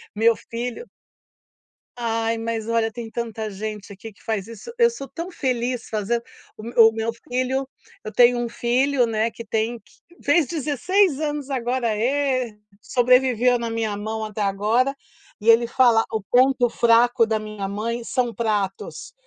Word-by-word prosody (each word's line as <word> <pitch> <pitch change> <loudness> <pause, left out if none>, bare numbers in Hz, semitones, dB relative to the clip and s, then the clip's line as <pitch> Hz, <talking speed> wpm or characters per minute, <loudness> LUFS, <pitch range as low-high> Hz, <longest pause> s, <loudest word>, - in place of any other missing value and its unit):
meu 225 +2 +4
filho 245 - -6 1.1
Ai 230 -1 -1
mas 225 -1 -3
olha 230 -1 +1
tem 230 0 -7
tanta 225 -1 -4
gente 210 +1 -6
aqui 210 +2 -10
que - - -24
faz 220 -3 -2
isso, 230 - -9
eu 470 -1 +5
sou 275 -13 -8
tão 345 +5 -7
feliz 250 -5 -2
fazendo, 220 +2 -1 0.4
o 225 +1 +5
o - - -7
meu 225 +1 -2 0.2
filho, 255 +2 -1 0.4
eu 215 - -6
tenho 245 0 +5
um 240 - -1
filho, 250 +3 +1
né, 225 0 0
que 230 - -9
tem 225 +3 -1
que - - -26 0.3
fez 290 0 +3
16 315 +2 +1
anos 295 -2 -3
agora 250 -1 -1
é, 255 -2 0 0.2
sobreviveu 250 0 +3
na 235 -1 -3
minha 225 -2 -2
mão 220 +1 -4
até 215 0 -5
agora, 215 +7 +1 0.5
e 225 - +2
ele 235 +1 +6
fala 235 -2 +4
o 220 - -1
ponto 250 +3 +3
fraco 235 +1 +4
da 220 -1 0
minha 215 -2 -5
mãe 230 +4 -3
são 240 0 -1
pratos, 205 - -3
235 Hz, 160 wpm, -23 LUFS, 220-255 Hz, 1.1 s, ele